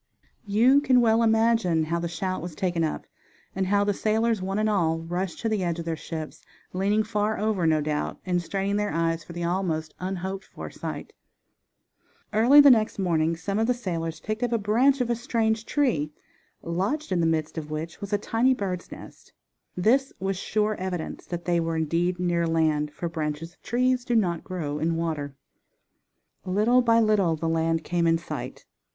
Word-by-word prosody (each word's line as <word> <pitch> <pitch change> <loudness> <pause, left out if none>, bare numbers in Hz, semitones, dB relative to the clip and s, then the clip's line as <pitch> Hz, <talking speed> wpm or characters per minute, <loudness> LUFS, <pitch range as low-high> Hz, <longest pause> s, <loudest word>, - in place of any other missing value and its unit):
You 240 +8 +5
can 260 -3 +4
well 225 -1 +4
imagine 225 -7 +3
how 170 +2 -1
the 170 - -2
shout 185 +3 -3
was 170 -2 -7
taken 175 -2 0
up, 155 - -2 0.5
and 190 0 0
how 200 +1 +3
the 205 0 +1
sailors, 220 +1 +1
one 195 +2 -2
and 215 0 +1
all, 170 -6 +1
rushed 175 +2 -3
to 230 - -1
the 210 -3 0
edge 170 -1 -1
of 170 - -5
their 165 -1 -1
ships, 155 0 -7 0.3
leaning 200 +4 +1
far 210 0 -1
over, 205 -5 0
no 155 -1 +3
doubt, 150 0 -2
and 180 -1 0
straining 195 +3 -2
their 210 0 0
eyes 165 -1 0
for 170 - -11
the 175 0 -4
almost 170 -3 -1
unhoped 190 +1 -4
for - - -9
sight. - - -7 1.2
Early 240 +7 +6
the 285 -1 +9
next 220 -3 +2
morning 165 -3 +1
some 195 +4 -3
one - - +1
of 225 - +1
the 250 - +2
sailors 165 -8 -4
picked 215 +5 -4
up 245 -1 0
a 235 - +2
branch 245 +6 +3
of 240 -1 0
a - - +2
strange 225 -1 -1
tree, 220 - +1 0.5
lodged 200 - -2
in 180 - +1
the 165 - +2
midst 155 -1 -1
of 155 -1 -8
which 155 +2 -5
was 200 0 -6
a 205 - +3
tiny 230 +5 +2
bird's 185 -5 -4
nest. - - -12 0.4
This 260 +9 +3
was 195 0 -1
sure 210 +3 0
evidence 180 -3 -5
that 175 -1 -5
they 175 -1 +2
were 165 0 -1
indeed 170 +3 0
near 170 -1 +1
land; 155 -2 +1
for 170 - -4
branches 160 0 -4
of - - -35
trees 250 +1 +1
do 245 -1 -1
not 175 -7 +1
grow 150 -6 -4
in 165 +2 0
water, 155 -4 -3 1.1
Little 215 +7 +3
by 230 -1 +4
little 210 -7 +3
the 165 +1 -3
land 165 0 0
came 170 0 0
in 165 0 +4
sight. 135 -6 -7
185 Hz, 195 wpm, -26 LUFS, 165-220 Hz, 1.2 s, the